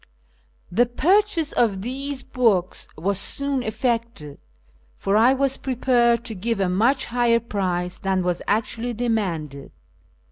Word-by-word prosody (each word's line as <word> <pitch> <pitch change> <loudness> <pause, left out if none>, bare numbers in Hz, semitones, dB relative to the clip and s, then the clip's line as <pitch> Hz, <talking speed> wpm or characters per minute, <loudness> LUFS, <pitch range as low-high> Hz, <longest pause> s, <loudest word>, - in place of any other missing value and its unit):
The 235 +7 +3
purchase 345 - +2
of 200 -5 +1
these 270 +3 -4
books 225 -9 0
was 190 +4 -1
soon 280 +4 -1
effected, 230 - -3 0.6
for 195 - -1
I 230 +4 +5
was 270 0 0
prepared 240 -2 +1
to 230 - -4
give 220 +2 -2
a 195 - +1
much 240 +9 +2
higher 240 -1 +2
price 185 -5 -3
than 190 -1 0
was 180 -1 -1
actually 230 +3 -1
de 240 +2 -2
manded. 160 -11 -2
230 Hz, 135 wpm, -23 LUFS, 190-255 Hz, 0.6 s, I